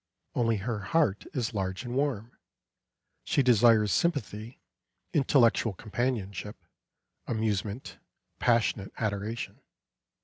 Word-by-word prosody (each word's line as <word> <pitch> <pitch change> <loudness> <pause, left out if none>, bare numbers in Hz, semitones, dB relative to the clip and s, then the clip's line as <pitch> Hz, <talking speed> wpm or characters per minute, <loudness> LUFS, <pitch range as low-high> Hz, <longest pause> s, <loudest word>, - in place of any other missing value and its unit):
Only 115 -2 +2
her 110 +2 -3
heart 105 - +1
is 120 -4 -2
large 95 +1 -2
and 120 - -4
warm; 125 -4 -1 0.9
she 140 - +2
desires 115 -3 +5
sympathy, 115 - -1 0.5
intellectual 125 -6 +3
companionship, 105 -1 -3 0.7
amusement, 110 0 -2 0.4
passionate 115 -4 +2
adoration. 105 +1 -3
115 Hz, 90 wpm, -29 LUFS, 105-125 Hz, 0.9 s, desires